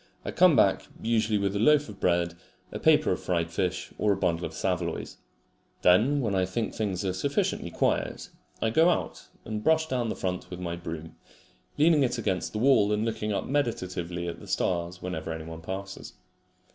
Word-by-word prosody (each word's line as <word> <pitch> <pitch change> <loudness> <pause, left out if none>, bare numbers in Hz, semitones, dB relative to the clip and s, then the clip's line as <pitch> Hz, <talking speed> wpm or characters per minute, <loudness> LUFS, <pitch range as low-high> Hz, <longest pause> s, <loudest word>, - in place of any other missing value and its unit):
I - - -2
come - - +5
back - - +3 0.2
usually 110 -2 +2
with 100 0 -1
a - - 0
loaf 150 +5 +4
of 105 -3 -11
bread, 85 -1 +1 0.4
a - - -5
paper 155 -1 +4
of - - 0
fried 85 -2 -1
fish, 90 +1 -2
or 105 - +3
a - - -3
bundle 85 -2 0
of - - -12
saveloys. - - -2 0.7
Then 120 +11 +4
when 110 -5 -1
I 95 -1 +2
think 100 +5 -2
things 100 -3 -2
are 95 - 0
sufficiently 140 +10 -1
quiet, - - -1 0.3
I 110 - +1
go 160 +8 +5
out 175 - -2 0.2
and 105 -1 -4
brush 160 0 +3
down 125 -4 -1
the - - -2
front 90 -1 -3
with 90 - -7
my 85 -1 -3
broom, 80 -1 -7 0.6
leaning 155 0 +5
it 125 -2 +1
against 100 -5 -1
the - - -4
wall 110 -4 +4
and 105 +1 +1
looking 110 -1 -2
up 100 - -1
meditatively 90 -10 -2
at 85 - -5
the 105 - -12
stars 90 -1 -1
whenever 80 -3 -4
anyone 80 0 -7
passes. 95 +3 -6
100 Hz, 190 wpm, -27 LUFS, 90-115 Hz, 0.7 s, come